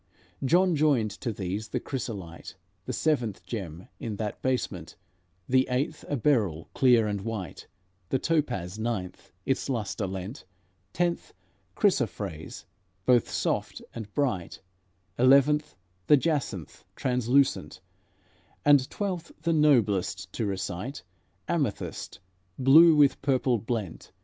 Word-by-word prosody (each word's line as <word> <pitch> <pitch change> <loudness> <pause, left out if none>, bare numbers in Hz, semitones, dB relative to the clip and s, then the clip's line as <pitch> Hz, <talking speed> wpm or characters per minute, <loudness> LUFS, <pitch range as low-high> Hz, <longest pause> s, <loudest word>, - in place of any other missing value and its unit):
John 175 +5 +3
joined 140 -8 +2
to 115 +4 -4
these 100 +1 -4
the 125 +3 -2
chrysolite, 100 -11 -6 0.3
The - - -1
seventh 125 -10 -1
gem 90 -6 -6
in 110 -2 -4
that 105 0 -4
basement; 100 -10 -2 0.5
The 130 +1 +3
eighth, 140 +5 -1
a 145 - 0
beryl, 105 - +1
clear 120 -4 +4
and 100 -2 -2
white; 105 -4 -6 0.4
The - - +2
topaz, 120 - -1
ninth, 110 -6 -4
its 135 +1 -1
luster 110 -5 -2
lent; 95 +7 -6 0.5
Tenth, 175 -1 -1 0.4
chrysophrase, 80 +1 -1 0.4
both 125 -2 +4
soft - - -1
and 110 -3 -7
bright; 125 -12 -1 0.6
Eleventh, 140 - +4 0.3
the 150 - +7
jacinth, 135 - -2
translucent; 125 - +1 0.9
And 145 -3 +5
twelfth, 185 -5 -4 0.2
and 160 -2 +3
noblest 100 -10 +2
to 110 - -2
recite, 95 +4 -4 0.4
Amethyst, - - -3 0.4
blue 155 +5 +7
with 145 -2 +4
purple 130 -3 +1
blent. 110 -5 -4
120 Hz, 115 wpm, -27 LUFS, 100-140 Hz, 0.9 s, the